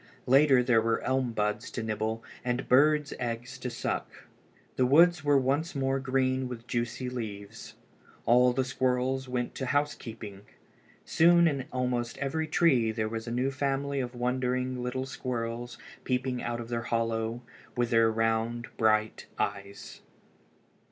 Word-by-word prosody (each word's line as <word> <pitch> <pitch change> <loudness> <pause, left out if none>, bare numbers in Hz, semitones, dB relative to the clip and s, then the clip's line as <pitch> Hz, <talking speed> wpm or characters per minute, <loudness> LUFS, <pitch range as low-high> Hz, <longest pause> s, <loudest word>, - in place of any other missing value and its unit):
Later 135 -1 +5
there 120 -2 +4
were 115 0 +1
elm 130 -2 0
buds 105 -1 -1
to 115 - -5
nibble 110 +1 -2 0.2
and 125 +1 -2
birds' 150 +3 +4
eggs 120 +2 -4
to 125 - -4
suck. 120 - -4 0.5
The 130 - +2
woods 170 +4 +5
were 145 -1 +4
once 140 +5 0
more 135 0 0
green 130 -1 0
with 120 -2 -8
juicy 120 +1 -2
leaves. 110 -4 -7 0.5
All 125 +2 +5
the 130 +2 0
squirrels 130 0 -1
went 125 -1 -2
to 130 - -4
housekeeping. 115 -8 -3 0.6
Soon 170 +1 +5
in 140 -4 -1
almost 125 -2 -2
every 155 +4 -2
tree 135 -8 +3
there 110 -1 -2
was 115 +1 -5
a - - -3
new 125 +3 0
family 140 0 -1
of 125 -1 -4
wondering 125 +1 -1
little 125 +1 -3
squirrels 120 -2 -4 0.3
peeping 125 -1 -1
out 120 0 -3
of 115 -1 -7
their 120 -1 -1
hollow 115 0 -1 0.3
with 120 -1 0
their 115 -1 +5
round, 115 +1 -1
bright 110 -1 +1
eyes. 100 0 -4
125 Hz, 145 wpm, -29 LUFS, 115-135 Hz, 0.6 s, Later